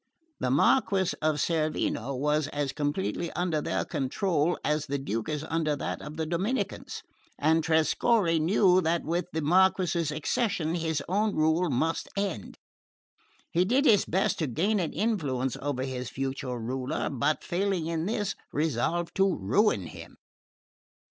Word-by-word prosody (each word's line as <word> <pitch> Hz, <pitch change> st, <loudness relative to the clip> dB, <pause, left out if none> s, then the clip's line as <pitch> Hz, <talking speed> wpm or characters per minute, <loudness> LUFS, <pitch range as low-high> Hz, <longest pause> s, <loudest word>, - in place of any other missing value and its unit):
The 125 Hz, -, 0 dB
Marquess 190 Hz, -, +3 dB
of 155 Hz, -1 st, +2 dB
Cerveno 150 Hz, -5 st, -1 dB
was 150 Hz, +2 st, +1 dB
as 145 Hz, -2 st, -2 dB
completely 160 Hz, +3 st, -2 dB
under 175 Hz, -4 st, 0 dB
their -, -, -1 dB
control 155 Hz, +4 st, 0 dB
as 150 Hz, 0 st, 0 dB
the 140 Hz, 0 st, -1 dB
Duke 115 Hz, -4 st, -3 dB
is 150 Hz, -1 st, -2 dB
under 160 Hz, -2 st, 0 dB
that 140 Hz, -, -4 dB
of 150 Hz, +1 st, -8 dB
the 160 Hz, -, -1 dB
Dominicans, 190 Hz, +11 st, -2 dB, 0.3 s
and 160 Hz, +2 st, +2 dB
Trescorre 165 Hz, +3 st, +2 dB
knew 185 Hz, +2 st, +4 dB
that 170 Hz, 0 st, 0 dB
with 170 Hz, +2 st, -1 dB
the 160 Hz, -1 st, -2 dB
Marquess's 175 Hz, -1 st, +3 dB
accession 160 Hz, +2 st, -1 dB
his 160 Hz, -4 st, -1 dB
own 205 Hz, +3 st, +1 dB
rule 160 Hz, +3 st, +2 dB
must 160 Hz, +5 st, -1 dB
end. 195 Hz, -, -3 dB, 0.9 s
He 175 Hz, -, +3 dB
did 255 Hz, +9 st, +2 dB
his 210 Hz, -7 st, +5 dB
best 190 Hz, +3 st, 0 dB
to 160 Hz, -, 0 dB
gain 195 Hz, -, +1 dB
an 170 Hz, -4 st, -1 dB
influence 140 Hz, -, -1 dB
over 140 Hz, -2 st, -2 dB
his 130 Hz, -2 st, -4 dB
future 135 Hz, -1 st, -3 dB
ruler, 125 Hz, +3 st, -3 dB
but 145 Hz, +3 st, 0 dB
failing 190 Hz, -2 st, -1 dB
in 165 Hz, +1 st, -2 dB
this 210 Hz, -2 st, -1 dB, 0.2 s
resolved 160 Hz, +4 st, -1 dB
to 195 Hz, -1 st, +3 dB
ruin 105 Hz, -, +2 dB
him. -, -, -11 dB
160 Hz, 150 wpm, -28 LUFS, 145-185 Hz, 0.9 s, his